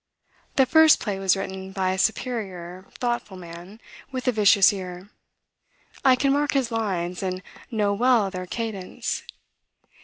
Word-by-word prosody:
The 265 - +5
first 320 +3 +6
play 200 -3 -3
was 195 0 +2
written 190 0 -6
by 190 -1 0
a 190 - -2
superior, 190 -6 -2
thoughtful 240 -5 -2
man, 175 +4 -11 0.3
with 255 -1 -5
a - - +5
vicious 205 -3 +5
ear. 185 0 -8 0.9
I 260 -1 +6
can 275 +2 +2
mark 290 0 +1
his 260 -4 0
lines, 185 -6 -2
and 185 -1 -3 0.3
know 210 -4 +1
well 230 -2 +3
their 185 -1 -6
cadence. 215 -4 -4
200 Hz, 145 wpm, -24 LUFS, 185-240 Hz, 0.9 s, first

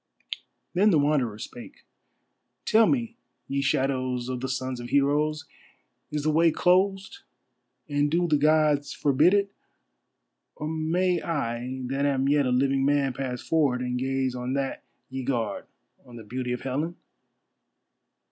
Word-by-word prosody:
Then 200 +4 +4
the 170 - +4
Wanderer 140 -7 +1
spake. 120 +2 -10 0.8
"Tell 220 0 +5
me, 235 -3 -1 0.3
ye 140 0 -1
shadows 130 -2 0
of 125 -1 -3
the 130 - -3
sons 130 -1 -3
of 120 0 -7
heroes, 150 +2 +1 0.6
is 150 -1 -3
the 155 - +2
way 165 +2 +4
closed, 190 - +1 0.7
and 145 0 +1
do 175 +3 +1
the 150 -3 +2
Gods 150 -1 +3
forbid 150 +7 +3
it, 200 -1 +1 1.0
or 150 - -5
may 165 +3 0
I 130 -5 -3
that 135 +3 0
am 135 -1 +1
yet 145 -1 +3
a - - 0
living 135 +1 +2
man 140 -1 +2
pass 125 -2 -4
forward 145 -6 +1
and 125 0 -2
gaze 130 0 -1
on 125 +1 -3
that 135 -1 -2 0.3
ye 130 0 -5
guard, 120 -6 -2 0.4
on 120 - -14
the 115 - -9
beauty 125 +3 -4
of 125 - -3
Helen?" 150 +6 -2
140 Hz, 145 wpm, -26 LUFS, 130-155 Hz, 1.0 s, Tell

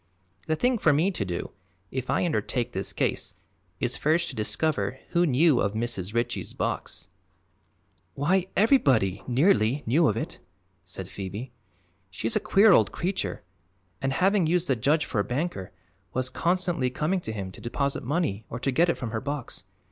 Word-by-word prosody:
The 155 - +2
thing 245 +6 +1
for 155 - +4
me 160 +7 +2
to 145 - -2
do, 90 -3 -4 0.4
if 130 -1 -4
I - - +2
undertake 125 -7 -1
this 95 -2 -3
case, - - -2 0.4
is - - 0
first 165 +3 +1
to 130 - -7
discover 110 +1 0
who 175 0 +3
knew 145 0 +4
of 100 +1 0
Mrs. 110 -3 -2
Ritchie's 120 +1 -2
box - - -3 0.5
" 90 -2 -41
"Why, 180 +6 +1
everybody, 130 - +3
nearly, 135 - +3
knew 150 +8 +4
of 105 - +1
it," - - -4 0.4
said - - -7
Phoebe. 100 +6 -6 0.6
"She's 110 +4 -2
a - - +4
queer 205 +2 +5
old - - +5
creature 185 - -3 0.6
and, 135 0 0
having 190 +2 +3
used 175 +1 +1
the 135 - +4
judge 145 +7 +2
for 115 - -2
a - - +3
banker, 125 - -3 0.4
was 130 0 0
constantly 175 -2 0
coming 155 +9 0
to 140 - -5
him 100 -3 -5
to - - -12
deposit 140 +4 -1
money 135 - -1
or 115 - -5
to 135 +2 0
get 170 +7 +3
it - - +1
from 120 -4 -4
her 110 - -2
box. 145 -3 -5
135 Hz, 175 wpm, -27 LUFS, 110-170 Hz, 0.6 s, queer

